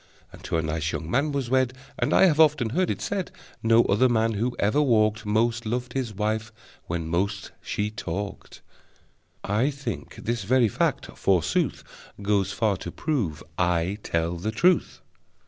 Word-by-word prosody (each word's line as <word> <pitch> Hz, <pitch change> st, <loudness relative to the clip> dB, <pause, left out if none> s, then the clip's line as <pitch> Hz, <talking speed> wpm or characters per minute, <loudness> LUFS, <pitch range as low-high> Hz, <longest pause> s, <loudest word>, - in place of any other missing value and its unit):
And -, -, -13 dB
to -, -, 0 dB
a 80 Hz, -, 0 dB
nice 80 Hz, 0 st, -1 dB
young 80 Hz, 0 st, -4 dB
man 145 Hz, +6 st, +2 dB
was 135 Hz, -4 st, -2 dB
wed, 130 Hz, -1 st, +2 dB, 0.3 s
And -, -, +1 dB
I -, -, +6 dB
have 160 Hz, -4 st, +3 dB
often 150 Hz, -7 st, +4 dB
heard 180 Hz, +6 st, +1 dB
it -, -, -2 dB
said 195 Hz, -3 st, -2 dB, 0.3 s
No 115 Hz, +1 st, +5 dB
other 115 Hz, +6 st, +3 dB
man 115 Hz, -1 st, +2 dB
who 120 Hz, +4 st, -1 dB
ever 110 Hz, +9 st, +2 dB
walked 110 Hz, -5 st, +2 dB
Most 115 Hz, +2 st, +1 dB
loved 120 Hz, +2 st, -3 dB
his 130 Hz, -4 st, -2 dB
wife 110 Hz, +2 st, -2 dB, 0.4 s
when 85 Hz, -1 st, -3 dB
most 95 Hz, +4 st, -1 dB
she 105 Hz, +1 st, -2 dB
talked! 100 Hz, -2 st, -6 dB, 0.8 s
(I 110 Hz, +7 st, +1 dB
think 135 Hz, -, -6 dB
this 115 Hz, -2 st, -3 dB
very 125 Hz, +3 st, +4 dB
fact, -, -, 0 dB
forsooth, 90 Hz, -5 st, +1 dB, 0.4 s
Goes 100 Hz, -1 st, +1 dB
far 100 Hz, 0 st, +1 dB
to -, -, -7 dB
prove 105 Hz, -, -2 dB, 0.2 s
I 90 Hz, +3 st, +1 dB
tell 85 Hz, -1 st, -1 dB
the 95 Hz, +6 st, -3 dB
truth!) 175 Hz, +10 st, +2 dB
110 Hz, 165 wpm, -25 LUFS, 95-125 Hz, 0.8 s, I